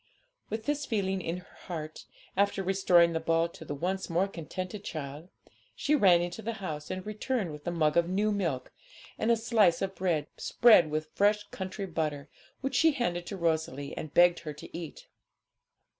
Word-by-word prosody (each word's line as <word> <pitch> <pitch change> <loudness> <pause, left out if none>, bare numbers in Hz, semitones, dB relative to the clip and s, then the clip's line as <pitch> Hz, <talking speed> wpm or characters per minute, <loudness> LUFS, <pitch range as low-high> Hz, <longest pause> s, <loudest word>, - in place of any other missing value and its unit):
With 220 +1 -4
this 295 +1 -1
feeling 195 -4 0
in 165 +1 -3
her - - -21
heart, 155 -4 -6 0.3
after 200 0 +1
restoring 180 -3 +4
the 160 - 0
ball 165 +1 +2
to 165 - -11
the 145 -2 -5
once 185 +6 -2
more 175 +3 +2
contented 185 +3 -6
child, 150 +1 -6 0.5
she 295 - 0
ran 185 -11 +5
into 175 +5 -5
the 230 +1 -3
house, 155 -8 -6
and 185 0 -4
returned 215 -2 -2
with 150 +1 -10
a - - +1
mug 155 -3 +1
of 170 0 +3
new 205 +3 +1
milk, 165 -11 -2 0.5
and 220 - +1
a 235 - +5
slice 220 -7 +3
of 195 0 -2
bread, 170 -6 0
spread 215 -10 +5
with 155 +1 -3
fresh 205 +1 +3
country 190 +1 -5
butter, 155 -5 -3 0.3
which 270 0 -2
she 310 +5 +4
handed 175 -10 -2
to 200 - -5
Rosalie 160 -5 -1
and 155 - -6
begged 175 +2 +5
her 155 -2 -6
to 150 - -11
eat. 165 -3 -7
175 Hz, 185 wpm, -30 LUFS, 160-205 Hz, 0.5 s, ran